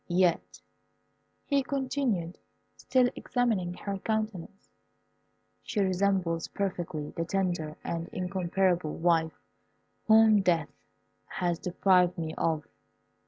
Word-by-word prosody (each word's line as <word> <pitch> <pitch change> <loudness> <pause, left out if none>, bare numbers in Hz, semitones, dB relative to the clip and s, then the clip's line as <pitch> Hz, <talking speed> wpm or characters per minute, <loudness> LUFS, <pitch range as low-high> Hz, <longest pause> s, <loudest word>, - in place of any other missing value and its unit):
Yet," 175 -1 +1 0.8
he 280 -2 +2
continued, 260 -10 -2 0.4
still 255 -1 +2
examining 215 -8 -1
her 200 0 -5
countenance, 215 -3 -4 0.9
"she 215 - -4
resembles 185 -3 +1
perfectly 175 -6 -3
the 165 - -3
tender 175 -4 -2
and 170 0 -3
incomparable 180 -2 0
wife 165 -1 +1 0.7
whom 220 -1 +6
death 170 -5 +1 0.6
has 175 -1 -2
deprived 180 0 +2
me 160 -1 -3
of. 160 -2 -1
180 Hz, 95 wpm, -29 LUFS, 170-200 Hz, 0.9 s, whom